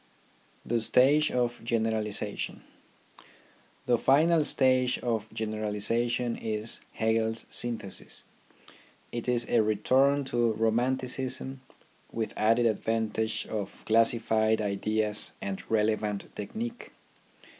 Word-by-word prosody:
THE 120 0 0
STAGE 140 +7 +4
OF 120 -1 -1
GENERALIZATION 110 -3 -1 1.2
The 120 -2 +2
final 155 +4 +4
stage 130 -3 +3
of 110 -3 -3
generalization 110 +3 0
is 110 0 -2
Hegel's 110 0 0
syn 120 -1 0
thesis. 100 - -6 0.9
It 120 +1 -4
is 120 -1 +2
a 120 - +3
return 130 +7 +2
to 120 -3 0
romanticism 130 +3 -1 0.5
with 110 -1 -3
added 115 +2 +2
ad 110 -3 +1
vantage 110 0 -1
of 105 -3 -6
classified 110 -1 +3
ideas 105 +1 -1
and 95 -1 -4
relevant 105 -2 -1
technique. 230 - -6
115 Hz, 100 wpm, -28 LUFS, 110-125 Hz, 1.2 s, STAGE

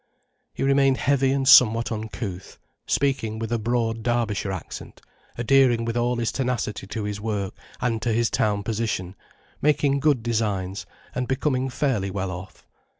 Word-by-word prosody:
He - - -2
remained 135 -1 +3
heavy 135 -1 +2
and 135 -1 0
somewhat 115 -4 +7
uncouth, 105 -4 -5 0.3
speaking 130 -6 0
with 115 0 -2
broad 115 -1 0
Derbyshire 110 -4 -1
accent, 95 -3 -7 0.4
adhering 120 -1 +3
with 115 0 -2
all 120 +1 +1
his 115 -2 -1
tenacity 120 -5 -2
to 110 +2 -4
his 105 0 -4
work 105 -3 -2 0.3
and 115 -3 -1
to 115 - 0
his 115 +1 +1
town 105 -1 +1
position, 110 -5 -2 0.5
making 145 -1 +2
good 140 -5 +2
designs, 105 -5 -2 0.3
and 125 0 -2
becoming 130 -1 0
fairly 125 -7 0
well 95 -1 -3
off. 95 +2 -9
115 Hz, 150 wpm, -24 LUFS, 105-130 Hz, 0.5 s, somewhat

